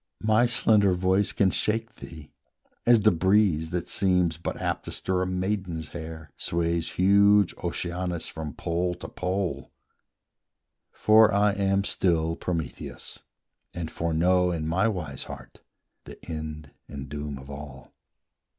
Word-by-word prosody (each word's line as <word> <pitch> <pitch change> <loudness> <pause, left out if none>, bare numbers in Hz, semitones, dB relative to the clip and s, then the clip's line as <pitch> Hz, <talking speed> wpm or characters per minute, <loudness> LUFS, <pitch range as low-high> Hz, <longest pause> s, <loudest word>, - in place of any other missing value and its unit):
My 110 +3 +4
slender 105 -5 +3
voice 95 +2 +1
can 95 -2 +2
shake 115 +5 -1
thee, 80 -2 -11 0.6
as 120 -2 +6
the 110 +1 +5
breeze, 90 -2 +2
That 90 0 -3
seems 90 -4 +1
but - - -4
apt - - -2
to - - -6
stir 90 0 -1
a 90 - 0
maiden's 90 -4 -2
hair, 80 -3 -8
Sways 85 0 -1
huge 100 +1 +4
Oceanus 85 0 -3
from 80 -4 -6
pole 90 +1 -1
to 90 - -9
pole: 90 0 -3 1.2
For 110 0 +5
I 105 +1 +3
am 100 0 +1
still 85 -4 +1
Prometheus, 85 -5 -5 0.5
and 85 -2 -4
foreknow 90 +2 +2
In 80 -3 -2
my 95 +7 +2
wise 85 -11 -4
heart - - -11 0.5
the - - -10
end 75 -2 -6 0.2
and 70 -1 -7
doom 75 0 -5
of 70 +1 -11
all. 70 -2 -10
90 Hz, 135 wpm, -26 LUFS, 80-100 Hz, 1.2 s, as